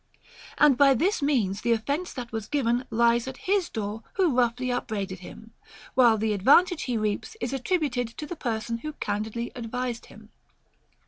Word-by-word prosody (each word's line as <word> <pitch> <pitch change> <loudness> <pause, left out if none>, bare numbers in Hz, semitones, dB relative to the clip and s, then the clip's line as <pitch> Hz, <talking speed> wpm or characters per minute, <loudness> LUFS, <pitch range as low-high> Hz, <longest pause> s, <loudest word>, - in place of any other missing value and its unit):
And 295 -4 +5
by 275 -1 +6
this 370 - +1
means 225 -9 +1
the 235 -1 +2
offence 285 +10 -2
that 245 -3 -7
was 220 -2 -4
given 245 -2 0
lies 235 +1 +2
at 265 - -6
his 385 -2 +1
door 215 0 -4
who 355 -9 +2
roughly 250 +1 +1
upbraided 200 -6 -3
him; 220 +5 -12 0.4
whilst 235 -4 +5
the 220 -1 +1
advantage 300 - +4
he 245 -3 -1
reaps 215 - -2
is 275 - -3
attributed 270 -4 0
to 305 - -5
the 350 - -6
person 230 -4 -3
who 305 +4 -6
can 205 -7 -2
didly 235 +2 -5
advised 245 0 -4
him. - - -15
240 Hz, 175 wpm, -26 LUFS, 220-285 Hz, 0.4 s, by